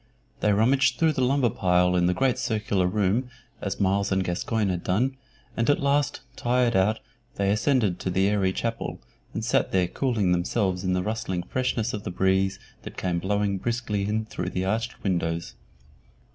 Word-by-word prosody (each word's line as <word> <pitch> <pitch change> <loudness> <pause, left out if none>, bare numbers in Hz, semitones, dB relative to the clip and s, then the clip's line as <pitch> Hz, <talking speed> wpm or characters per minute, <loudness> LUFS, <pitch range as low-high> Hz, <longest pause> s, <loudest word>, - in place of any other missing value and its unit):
They 105 - +2
rummaged 125 +6 +3
through 160 -1 +3
the 130 - 0
lumber 130 -2 +2
pile 90 -1 +2
in 90 0 +3
the 90 - +1
great 130 -1 +1
circular 105 -7 0
room 105 +6 0 0.3
as - - -3
Myles 100 +1 +1
and 95 0 +2
Gascoyne 100 +4 -1
had 90 -2 -2
done, 125 +9 +1 0.4
and 115 +2 0
at 145 - +4
last, 140 0 +1
tired 120 -1 +1
out, 100 +4 +3 0.4
they 100 0 +1
ascended 105 -4 +1
to - - -3
the 95 +2 +2
airy 100 -2 +2
chapel, 115 +4 -3 0.3
and - - -4
there - - +3 0.2
sat 90 - -4
cooling 115 -9 +1
themselves 90 +1 0
in 95 -1 +1
the 90 0 0
rustling 95 -4 -2
freshness 125 -1 -1
of 105 -1 -4
the - - -4
breeze 95 +1 +1 0.2
that - - -10
came 90 -2 -1
blowing 100 +1 0
briskly 110 -3 -2
in 110 +1 -1
through 90 -4 -4
the 95 0 -2
arched 110 +4 -2
windows. 85 -3 -1
100 Hz, 180 wpm, -26 LUFS, 95-120 Hz, 0.4 s, at